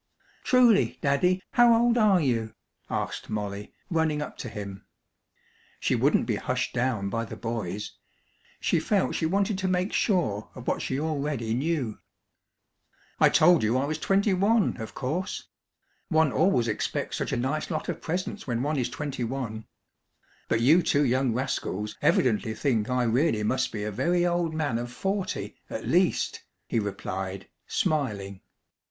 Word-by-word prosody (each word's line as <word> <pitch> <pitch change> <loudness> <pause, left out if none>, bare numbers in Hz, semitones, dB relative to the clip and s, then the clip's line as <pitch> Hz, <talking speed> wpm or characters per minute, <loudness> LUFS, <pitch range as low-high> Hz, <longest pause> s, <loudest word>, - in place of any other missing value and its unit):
"Truly, 245 -5 +4
Daddy, 180 +7 +2
how 240 -1 +6
old 240 0 +3
are 210 -5 +5
you?" 115 -7 -1 0.3
asked - - -3
Molly, 105 -1 -4 0.2
running 160 -2 +1
up 150 - -5
to 125 - -5
him. 100 -2 -7 1.0
She - - +1
wouldn't - - +3
be - - 0
hushed - - -2
down 120 -6 0
by 115 +3 -1
the 115 - -7
boys. 105 -4 -4 0.7
She - - +1
felt 200 -3 +1
she 160 - 0
wanted 195 +2 0
to 190 - -1
make 185 +2 0
sure 130 - +1
of 125 - -9
what - - 0
she 130 - -2
already 145 -7 -2
knew. 135 -4 -1 1.2
"I - - +6
told 175 +1 +5
you 110 +4 +2
I 135 - +1
was 155 +1 -3
twenty 195 +3 +2
one, 205 - +2
of 110 -2 -7
course! 155 +9 -3 0.6
One 160 -4 +3
always 160 -9 +2
expects 110 - -2
such - - -2
a - - 0
nice 135 +5 -1
lot 155 -3 -3
of 170 -2 -4
presents 180 +3 -3
when 120 0 -1
one 150 +1 0
is 125 -1 0
twenty 135 -1 -4
one! 115 -3 -4 0.8
But 115 - +1
you 155 +9 +6
two 145 -3 +2
young 130 0 +2
rascals 110 -4 -2
evidently 110 -2 +2
think 115 -3 0
I 125 0 +1
really 120 -1 +2
must 130 +4 0
be 105 -2 -4
a 105 - -2
very 175 - +1
old 175 -2 0
man 145 -7 0
of 120 0 -5
forty 195 +8 -3
at - - -5
least!" - - +2 0.3
he 115 - 0
replied, 95 -2 -4 0.2
smiling. 105 - -1
135 Hz, 160 wpm, -27 LUFS, 115-175 Hz, 1.2 s, how